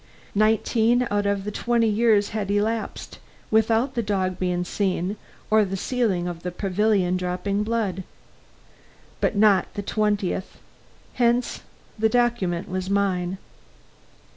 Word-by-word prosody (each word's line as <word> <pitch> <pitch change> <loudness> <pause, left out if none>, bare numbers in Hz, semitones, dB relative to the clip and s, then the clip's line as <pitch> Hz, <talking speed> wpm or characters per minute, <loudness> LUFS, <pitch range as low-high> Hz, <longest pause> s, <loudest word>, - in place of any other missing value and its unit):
Nineteen 225 +3 +2
out 205 0 +1
of 200 -1 0
the 210 - -4
twenty 235 +1 +1
years 215 -1 +3
had 210 -2 -3
elapsed, 215 +2 -2 0.3
without 225 +4 +2
the 235 - 0
dog 190 -3 -1
being 180 -1 0
seen 190 0 -1 0.4
or 215 0 +5
the 195 -1 -3
ceiling 200 -6 0
of 170 -1 -5
the 180 - -3
pavilion 190 0 +1
dropping 185 +3 -2
blood. 210 -4 -1 1.2
But - - 0
not 205 -1 +4
the 205 - -3
twentieth; 205 -3 -1 0.6
hence, 240 0 +1 0.4
the 220 0 +3
document 235 -8 0
was 185 0 -3
mine. 190 -2 0
205 Hz, 125 wpm, -24 LUFS, 185-220 Hz, 1.2 s, or